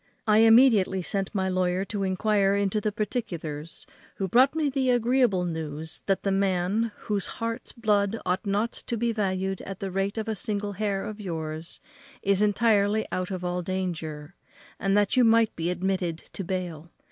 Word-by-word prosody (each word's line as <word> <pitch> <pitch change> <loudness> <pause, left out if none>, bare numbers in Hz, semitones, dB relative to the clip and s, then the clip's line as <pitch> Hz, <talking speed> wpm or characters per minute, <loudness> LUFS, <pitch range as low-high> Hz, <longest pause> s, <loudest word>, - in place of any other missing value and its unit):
I 215 -1 +5
immediately 225 -5 +5
sent 195 +1 -2
my 190 -1 +1
lawyer 185 0 0
to 205 0 -4
enquire 195 +1 +2
into 200 +1 0
the 215 - 0
particulars, 170 - -4 0.3
who 195 - -2
brought 255 - +4
me 315 -2 +1
the 265 -2 0
agreeable 245 -6 +3
news 160 -1 -4
that 195 -1 +1
the 195 - +1
man, 195 +3 +1
whose 205 -2 -1
heart's 230 0 -3
blood 210 -1 +1
ought 185 +1 0
not 205 +3 0
to 235 - -5
be 235 +1 +1
valued 190 -3 -1
at 195 - -7
the 195 -1 -4
rate 195 +3 -1
of 220 0 -2
a 220 - 0
single 205 0 -2
hair 200 -1 -2
of 215 0 -6
yours, 160 -3 -5 0.4
is 200 0 +2
entirely 210 0 +3
out 185 0 -2
of 185 -2 -4
all 180 0 -1
danger, 170 -4 -4 0.5
and 195 +1 +2
that 205 +2 +2
you 255 - +5
might 225 -1 +4
be 165 +1 -2
admitted 180 -2 -1 0.2
to 195 - -4
bail. 175 -3 -4
195 Hz, 175 wpm, -26 LUFS, 180-215 Hz, 0.5 s, I